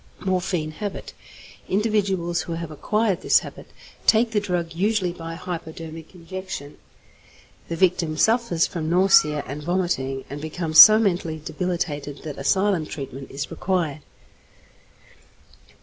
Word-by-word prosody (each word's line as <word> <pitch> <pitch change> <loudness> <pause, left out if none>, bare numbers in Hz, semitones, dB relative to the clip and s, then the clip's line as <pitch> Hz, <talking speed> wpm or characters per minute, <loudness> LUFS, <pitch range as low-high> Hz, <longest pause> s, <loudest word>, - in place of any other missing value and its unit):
=Morphine 180 -4 -1
Habit.= 205 +5 -6 0.6
Individuals 195 -4 0
who 170 - -5
have 165 -1 -5
acquired 210 +5 0
this - - +4
habit - - -10 0.4
take 225 +1 +4
the 215 - +2
drug 175 -5 -3
usually 195 +1 0
by 165 -1 -7
hypodermic 165 -1 -8
injection. 175 -4 -8 0.9
The 170 - -2
victim 170 -3 +1
suffers 220 -5 +2
from 160 -2 -4
nausea 170 -5 +4
and 140 +3 -6
vomiting, 150 -6 -1
and 145 +2 -7
becomes 155 0 +1
so 215 +7 +12
mentally 175 -7 0
debilitated 150 -6 -3
that 150 -3 -7
asylum 190 +2 +1
treatment 135 -2 -7
is 140 0 -5
required. 170 -6 -1
170 Hz, 120 wpm, -23 LUFS, 155-190 Hz, 0.9 s, so